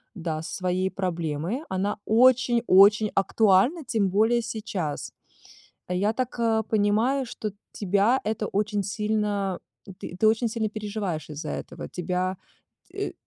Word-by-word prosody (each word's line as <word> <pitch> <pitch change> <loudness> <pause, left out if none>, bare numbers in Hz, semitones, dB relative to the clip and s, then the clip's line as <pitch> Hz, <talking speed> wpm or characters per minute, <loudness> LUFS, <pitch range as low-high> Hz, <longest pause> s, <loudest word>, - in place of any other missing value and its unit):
да, 160 -4 -3
со 160 - -7
своей 185 0 0
проблемой. 170 - -3
Она 190 +2 -1
очень-очень 225 -4 +5
актуальна, 215 - +3
тем 210 -5 +1
более 225 +5 +3
сейчас. 195 -9 -4 0.8
Я 195 +5 0
так, 250 0 -3
а, 225 -1 +2
понимаю, 220 +6 +1
что 215 -2 -5 0.2
тебя 205 +6 +2
это 215 0 -2
очень 205 0 -1
сильно 205 -2 -1 0.4
ты - - -7
ты 215 - +3
очень 225 +2 +2
сильно 220 -1 -2
переживаешь 205 -7 -4
из-за 150 0 -6
этого. - - -6
Тебя 180 +1 -2 0.5
т - - -3
э, - - -14
205 Hz, 130 wpm, -26 LUFS, 185-225 Hz, 0.8 s, очень-очень